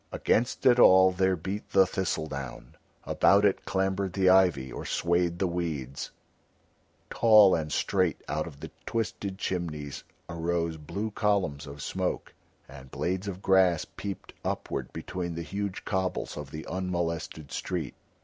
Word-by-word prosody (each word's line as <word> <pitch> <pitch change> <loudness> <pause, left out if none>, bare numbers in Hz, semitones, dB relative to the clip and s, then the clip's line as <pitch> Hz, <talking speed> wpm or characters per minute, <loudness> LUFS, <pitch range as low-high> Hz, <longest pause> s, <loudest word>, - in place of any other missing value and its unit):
Against 120 +3 0
it 125 -1 +6
all 95 -3 +7
there 95 0 +2
beat 95 +5 -5
the 95 -1 +6
thistle 90 -4 -2
down, 70 -4 -7 0.3
about 100 +1 +4
it 100 - +1
clambered 95 -1 -1
the 95 -1 +4
ivy 90 -9 +3
or - - -6
swayed 85 0 0
the 95 - 0
weeds; 80 -7 -3 1.0
tall 110 -4 +7
and 75 -2 -1
straight 90 -3 +1
out 75 +2 -2
of 75 -4 -12
the - - -7 0.2
twisted 100 -4 -3
chimneys 80 -7 -4 0.2
arose 85 -1 -2
blue 95 +8 -4
columns 100 -9 0
of 70 +1 -8
smoke, - - -3 0.3
and 65 -2 -12
blades 95 +7 -2
of 95 -1 -6
grass 95 -4 +4
peeped 100 -2 -7
upward - - -3
between 90 -2 -5
the 85 - -4
huge 100 +4 -4
cobbles 95 -2 -2
of 75 -2 -7
the 80 +2 -7
unmolested 85 -5 -3
street. - - -3
90 Hz, 145 wpm, -28 LUFS, 80-95 Hz, 1.0 s, all